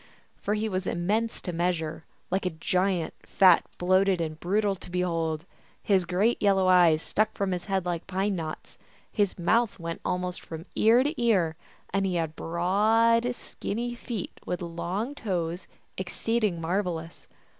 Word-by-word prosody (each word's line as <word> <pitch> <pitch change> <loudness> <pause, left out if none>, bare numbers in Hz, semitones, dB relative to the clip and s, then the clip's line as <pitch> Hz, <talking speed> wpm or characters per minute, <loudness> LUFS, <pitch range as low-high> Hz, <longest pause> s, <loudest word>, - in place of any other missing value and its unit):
For 210 - -2
he 215 +1 -1
was 185 -2 -2
immense 210 +7 0
to 180 - -4
measure, 165 -2 -1 0.3
like 190 0 +1
a 160 -3 -5
giant, 180 0 0
fat, 185 -3 +5
bloated, 185 +1 +3
and 155 -1 -3
brutal 200 +3 +1
to 190 - -11
behold. 165 -3 -1 0.4
His 190 -3 +3
great 195 +7 +1
yellow 195 -2 +3
eyes 175 -4 +5
stuck 215 +1 0
from 195 -1 0
his 180 -1 -3
head 195 -3 -1
like 175 -1 -3
pine 195 +2 0
knots, 160 -3 -6 0.3
his 205 -3 0
mouth 220 +5 +2
went 165 -2 -5
almost 180 0 -2
from 160 +1 -8
ear 230 +4 +5
to 295 -1 -2
ear, 185 -9 +3 0.4
and 195 - +2
he 190 -2 0
had 160 -2 -1
broad, 225 +8 +2
skinny 240 +2 -4
feet 235 -5 -5
with 180 0 -3
long 180 +9 -3
toes, 180 - -3 0.3
exceeding 205 0 -1
marvelous. 165 -1 -3
185 Hz, 155 wpm, -27 LUFS, 170-210 Hz, 0.4 s, fat